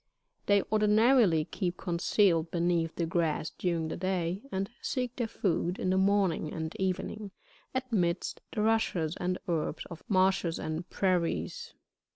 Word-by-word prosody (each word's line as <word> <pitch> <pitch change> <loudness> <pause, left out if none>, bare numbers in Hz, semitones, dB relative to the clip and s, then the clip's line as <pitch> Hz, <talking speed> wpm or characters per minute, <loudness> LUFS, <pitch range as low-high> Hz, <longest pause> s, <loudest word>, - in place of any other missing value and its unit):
They 200 -1 +4
ordinarily 215 - +4
keep 180 -1 -3
concealed 170 -1 +2
beneath 170 -1 0
the 170 - 0
grass 165 -2 0
during 170 -3 -1
the - - -3
day, 185 0 -1
and 190 +1 -1
seek 250 -2 -2
their 240 -3 -1
food, 180 -4 -1
in 185 - 0
the 190 - +2
morning 190 -5 +2
and 160 0 -4
evening, 190 +2 -2 0.6
amidst 180 -4 0
the 210 - -1
rushes 195 -8 +1
and 180 +1 -1
herbs 165 -2 -2
of 170 - -9
marshes 185 -3 +2
and 160 +3 -4
prairies. 190 - -1
180 Hz, 140 wpm, -30 LUFS, 170-205 Hz, 0.6 s, They